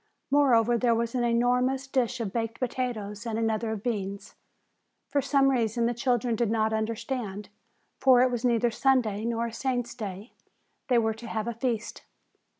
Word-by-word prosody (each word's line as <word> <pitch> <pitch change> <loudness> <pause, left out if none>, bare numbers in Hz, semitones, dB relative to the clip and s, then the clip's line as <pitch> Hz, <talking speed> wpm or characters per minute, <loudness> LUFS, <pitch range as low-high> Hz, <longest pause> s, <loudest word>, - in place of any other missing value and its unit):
Moreover, 240 -5 +4
there 235 -1 +3
was 230 0 -1
an 250 -2 0
enormous 250 +3 +1
dish 255 -2 -1
of 210 -5 -3
baked 225 -1 -3
potatoes 235 -4 -3
and 225 -1 -2
another 225 0 0
of 215 -2 -4
beans. 200 -4 -3 0.8
For 285 - +1
some 275 0 +3
reason 235 -2 +1
the 240 - +1
children 245 -1 0
did 230 -1 0
not 220 0 +1
understand, 220 -2 -3 0.5
for 255 -2 +6
it 255 - +2
was 240 -1 -3
neither 240 -1 +2
Sunday 230 -5 +1
nor 235 0 -1
a 230 - -5
saint's 245 0 -2
day, 205 -1 -7 0.5
they 250 - +3
were 220 -1 +2
to 230 +2 -10
have 220 -1 -3
a 235 - -2
feast. 230 -1 -3
235 Hz, 170 wpm, -27 LUFS, 220-250 Hz, 0.8 s, for